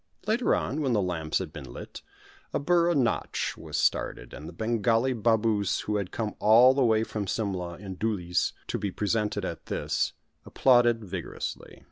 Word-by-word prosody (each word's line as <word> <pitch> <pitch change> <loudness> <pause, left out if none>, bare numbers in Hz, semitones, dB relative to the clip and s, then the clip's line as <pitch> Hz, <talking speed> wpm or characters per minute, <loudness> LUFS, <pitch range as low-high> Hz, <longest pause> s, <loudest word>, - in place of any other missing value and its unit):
Later 225 +4 +2
on, 150 +4 -2
when 135 -4 +1
the 105 - +3
lamps 85 -4 -1
had 90 -5 -5
been 70 -5 -8
lit, - - -9 0.5
a - - +2
burra 170 +2 +3
nâtch 130 -5 0
was - - -6
started, - - 0
and 75 - -8
the - - -9
Bengali 115 +5 +1
Baboos 110 -3 +1
who 105 0 -1
had 100 -3 -3
come 110 -2 -3
all 120 +5 +7
the 135 0 +2
way 110 -2 +3
from 105 -3 -4
Simla 90 -5 -2
in 95 -1 -8
dhoolies 90 -5 0
to - - -3
be 100 - -2
present 105 +2 -1
at 95 -5 -4
this, - - -1 0.3
applauded 120 -3 +3
vigorously. 95 -3 -6
110 Hz, 170 wpm, -27 LUFS, 95-120 Hz, 0.5 s, all